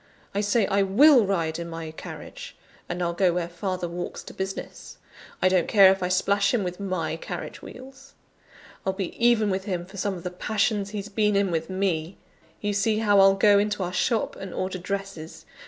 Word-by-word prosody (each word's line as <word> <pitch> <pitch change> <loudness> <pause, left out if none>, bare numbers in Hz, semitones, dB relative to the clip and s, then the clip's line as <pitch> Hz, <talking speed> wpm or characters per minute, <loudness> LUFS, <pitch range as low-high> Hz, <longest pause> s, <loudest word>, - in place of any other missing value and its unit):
I 200 - 0
say 205 +1 +2
I 200 +1 +1
will 235 +4 +6
ride 165 -4 -1
in 170 0 -5
my 165 -1 -6
carriage: - - -9 0.3
and 175 0 -2
I'll 170 0 -1
go 180 +1 +3
where 175 -1 -1
father 180 +1 -4
walks 175 +1 -6
to - - -11
business: 190 0 -6 0.5
I - - +6
don't 185 -2 +2
care 195 -3 +7
if 190 0 -1
I 180 - 0
splash 200 +4 +2
him 215 - 0
with 180 0 -5
my 185 -5 -2
carriage - - -7
wheels! 270 +2 -13 0.7
I'll 190 - -1
be 190 -2 -4
even 225 -4 +4
with 190 0 -2
him 180 -3 -3
for 190 +2 -13
some 200 0 -1
of 175 - -9
the 180 - -4
passions 205 +2 -1
he's 205 -1 -5
been 210 0 +1
in 200 -2 +2
with 165 0 -2
me. 185 -2 -2 0.4
You 205 0 -1
see 215 +2 +1
how 205 -2 +3
I'll 195 0 +6
go 200 0 +5
into 205 -1 -1
our 180 0 -4
shop 225 +4 0
and 190 -2 -8
order 185 0 -3
dresses! 195 -3 -6
195 Hz, 205 wpm, -25 LUFS, 180-205 Hz, 0.7 s, care